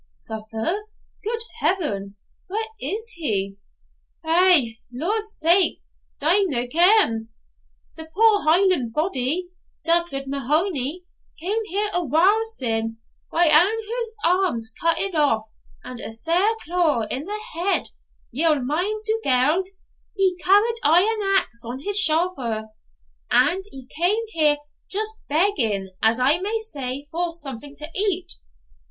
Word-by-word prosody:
'Suffer! 220 - -4 0.4
Good 460 +2 -3 0.2
heaven! 205 - -1 0.3
Why, 395 - -5 0.2
where - - -1
is 440 +3 -3
he?' 200 - -2 0.7
'Eh, 330 -7 +6 0.2
Lord's 420 - -2
sake! 345 +4 +5 0.4
d'ye 335 +8 +3
no 245 -7 -1
ken? 315 - +3 0.7
The 320 - -8
poor 425 +3 +3
Hieland 315 - +2
body, 310 +2 0 0.4
Dugald 335 -5 +1
Mahony, 290 +4 -1 0.4
cam 390 +7 -1
here 415 +1 0
a 355 - +1
while 360 - +2
syne, 225 - -2 0.3
wi' 345 +1 +3
ane 310 - +4
o' 405 +9 +4
his 465 -2 -4
arms 335 -12 0
cuttit 335 +4 +1
off, 280 -9 +1 0.4
and 250 -1 -9
a - - -3
sair 335 - +1 0.2
clour 320 -8 0
in 270 +4 -3
the 420 +3 -4
head 350 +4 0 0.4
ye'll 305 +5 +2
mind 360 +12 -2
Dugald, 355 - +1 0.5
he 385 -2 +1
carried 415 +5 +3
aye 330 +5 +4
an 390 -2 +2
axe 235 -8 -8
on 240 +2 -6
his 405 +9 +3
shouther 290 - 0 0.6
and 380 +2 +2
he 265 -2 -11
cam 350 +10 +1
here 305 -6 +2 0.3
just 430 +2 -2 0.2
begging, 240 - 0
as 225 +2 +2
I 280 +6 +3
may 415 +4 -2
say, 285 - -3
for 340 +1 -2
something 280 -2 -8
to 300 - -3
eat. 385 -3 0
330 Hz, 130 wpm, -22 LUFS, 260-390 Hz, 0.7 s, Eh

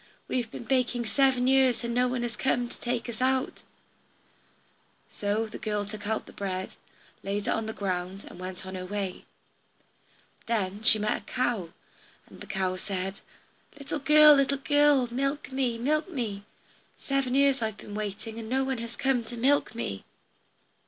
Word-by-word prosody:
We - - -1
have 240 -3 -2
been - - -7
baking 245 -1 +1
seven 260 +1 +3
years, 260 -2 +4
and 235 0 -2
no 250 +1 +3
one 250 -1 -1
has 235 -1 -3
come 245 -2 +1
to - - -12
take 240 -1 -2
us 235 0 -6
out." 260 0 +1 1.5
So 205 +2 -1
the 220 - -8
girl 210 -1 -1
took 205 0 -7
out 220 0 -1
the - - -14
bread, 190 -2 -3 0.5
laid 200 +1 -2
it - - -1
on 225 0 -1
the - - -2
ground, 185 0 -3
and - - -11
went 185 0 -7
on 190 - -7
her 185 -1 -5
way. 195 -2 -4 1.2
Then 205 -3 -1
she 225 -1 +6
met 210 0 0
a - - -25
cow, 240 -9 -1 0.6
and - - -15
the - - -9
cow 185 -1 -1
said, 190 0 -4 0.6
"Little 285 +1 -4
girl, 300 +1 +8
little 275 0 +3
girl, 290 -2 +4
milk 275 +2 -1
me, 260 -3 0
milk 305 +7 0
me! 220 - -4 0.5
Seven 275 -2 -1
years 275 -1 +4
have 225 - 0
I - - -14
been 205 - -9
waiting, 215 +2 -5
and 220 -1 -7
no 265 +2 +2
one 265 -2 -2
has 235 0 -6
come 265 -3 +1
to 240 +1 -6
milk 270 0 +2
me." 100 - -4
235 Hz, 180 wpm, -28 LUFS, 205-265 Hz, 1.5 s, girl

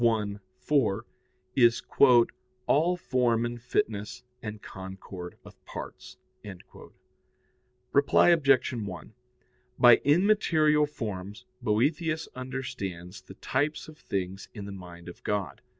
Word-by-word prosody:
4], 120 -6 +2 0.5
is 120 -2 +4 0.8
"all 170 +5 +2
form 120 -7 +1
and 120 0 -5
fitness 105 -3 -2 0.2
and 105 -2 -6
concord 95 -2 -9
of - - -16
parts." - - -9 1.7
Reply 145 +4 +4
Obj. 140 -7 +4
1: 100 - -6 0.6
By 120 -1 +8
immaterial 155 -3 +3
forms 100 -7 -6 0.2
Boethius 150 +8 0
understands 100 -9 -6
the 95 - -13
types 145 +8 -2
of 155 -1 -13
things 95 0 -4
in 105 -2 -6
the 100 - -7
mind 90 -3 -11
of 90 - -11
God. 105 -2 -2
115 Hz, 105 wpm, -28 LUFS, 95-145 Hz, 1.7 s, By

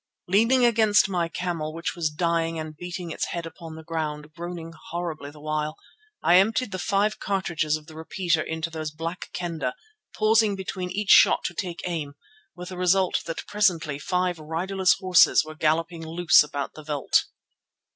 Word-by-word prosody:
Leaning 230 +7 +4
against 220 -4 +4
my 175 -3 -1
camel, 165 -3 -3
which 165 - -3
was 165 -3 0
dying 165 +1 0
and 155 -1 -6
beating 175 +1 -6
its - - -2
head 170 -1 -4
upon 165 -1 -9
the 160 - -10
ground, 155 -2 -4
groaning 170 0 -7 0.2
horribly 165 -4 -4
the 150 +1 -14
while, 155 0 -2 0.5
I 175 - +6
emptied 220 +4 +2
the 185 - -4
five 205 +4 +1
cartridges 170 -6 -1
of 155 - -15
the 155 - -13
repeater 170 0 -1
into 160 +1 -4
those 155 -1 -4
Black 165 +4 -6
Kendah, 165 -7 -3 0.4
pausing 215 -1 +3
between 185 -1 -4
each 205 +1 0
shot - - +7
to 185 - -3
take 175 -1 -4
aim, 155 -5 -4 0.4
with 180 0 -8
the 185 - -7
result 180 +1 +2
that 165 - -5
presently 170 -9 +1
five 180 +1 -1
riderless 175 +3 +1
horses 185 -4 +5
were 155 - -8
galloping 165 +2 0
loose 165 +1 +5
about 145 -1 -3
the 155 - -10
veld. 150 -2 +1
170 Hz, 170 wpm, -25 LUFS, 155-185 Hz, 0.5 s, shot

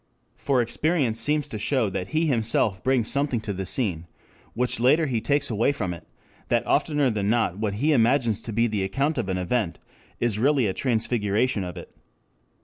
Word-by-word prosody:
] - - -43
For 130 -4 +3
experience 130 -2 0
seems 150 -1 0
to 110 - -5
show 125 +1 +1
that 90 0 -3
he 160 +6 0
himself 115 -7 +1
brings 130 -4 +1
something 140 -3 0
to 105 - -4
the 95 0 -5
scene 90 -8 -1 0.5
which 125 -1 0
later 145 +7 +4
he 120 -6 -1
takes 145 0 0
away 115 +5 +2
from 105 -11 -3
it, 85 - -12 0.4
that - - +1
oftener 145 -4 +1
than 105 -2 -1
not 110 -5 +1
what 105 -2 -1
he 145 +9 +1
imagines 120 -3 +2
to 115 - -7
be 115 +2 +2
the 105 -3 -1
account 135 +11 -1
of 95 - -3
an 95 - -1
event 90 0 -1 0.4
is 115 -3 0
really 135 0 +3
a 95 - 0
transfiguration 110 -2 0
of 90 -2 -7
it. - - -11
115 Hz, 195 wpm, -25 LUFS, 105-135 Hz, 0.5 s, later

